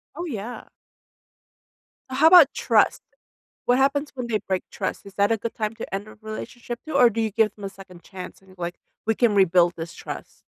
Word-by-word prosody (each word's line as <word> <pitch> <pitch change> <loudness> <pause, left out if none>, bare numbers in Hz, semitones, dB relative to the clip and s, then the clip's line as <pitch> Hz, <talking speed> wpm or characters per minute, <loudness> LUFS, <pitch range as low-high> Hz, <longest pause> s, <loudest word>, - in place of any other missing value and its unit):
Oh, 345 - -4
yeah. 240 - -6 1.4
How 270 +5 +4
about 330 -4 +8
trust? - - +2 0.6
What 245 +1 +3
happens 280 +2 +2
when 250 -2 -4
they 225 -2 0
break 190 -1 0
trust? - - -4
Is 200 - -12
that 205 +2 +2
a 225 - +1
good 230 +2 -5
time 215 -1 -2
to 220 - -6
end 200 +2 -4
a - - -13
relationship, 235 +2 -7
too, 310 - -5
or 250 -3 +7
do 225 +1 -2
you 220 - 0
give 215 +1 +2
them 205 - -11
a - - -2
2nd 190 -3 -14
chance 185 0 -10
and, 190 -1 -18
like, 175 0 -4 0.3
we 225 - +2
can 230 -2 +2
rebuild 180 -3 +4
this 165 0 -6
trust? - - -8
215 Hz, 205 wpm, -24 LUFS, 195-245 Hz, 1.4 s, about